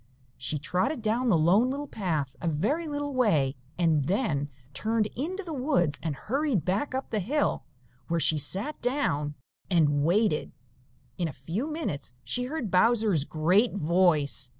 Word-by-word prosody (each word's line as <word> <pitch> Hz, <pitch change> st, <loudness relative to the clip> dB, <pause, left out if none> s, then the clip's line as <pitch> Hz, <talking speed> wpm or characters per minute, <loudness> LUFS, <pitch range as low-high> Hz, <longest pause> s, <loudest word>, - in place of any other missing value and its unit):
She 150 Hz, +4 st, -1 dB
trotted 215 Hz, -, -1 dB
down 235 Hz, +3 st, +1 dB
the 185 Hz, -, +4 dB
Lone 190 Hz, +10 st, +4 dB
Little 280 Hz, +2 st, -3 dB
Path 160 Hz, -, -2 dB
a 170 Hz, -, -2 dB
very 215 Hz, -, 0 dB
little 290 Hz, -1 st, -3 dB
way 160 Hz, -, +2 dB, 0.2 s
and 160 Hz, -5 st, +2 dB
then 155 Hz, -, 0 dB, 0.2 s
turned 220 Hz, +10 st, 0 dB
into 365 Hz, +10 st, -3 dB
the 335 Hz, -3 st, -6 dB
woods 255 Hz, -, +1 dB
and 160 Hz, -3 st, -2 dB
hurried 265 Hz, -, -1 dB
back 210 Hz, +9 st, -1 dB
up 265 Hz, -, -4 dB
the 215 Hz, -, 0 dB
hill, 285 Hz, +10 st, 0 dB, 0.4 s
where 170 Hz, 0 st, 0 dB
she 155 Hz, -1 st, +4 dB
sat 195 Hz, -, 0 dB
down 195 Hz, -, 0 dB, 0.3 s
and 145 Hz, -5 st, +3 dB
waited. 185 Hz, +1 st, +1 dB, 0.7 s
In 175 Hz, -, +1 dB
a -, -, -5 dB
few 165 Hz, -, -4 dB
minutes 225 Hz, -, -4 dB
she 250 Hz, 0 st, 0 dB
heard 255 Hz, -, -4 dB
Bowser's 210 Hz, -, +3 dB
great 180 Hz, +11 st, +2 dB
voice. 155 Hz, -7 st, +2 dB
195 Hz, 155 wpm, -28 LUFS, 155-255 Hz, 0.7 s, the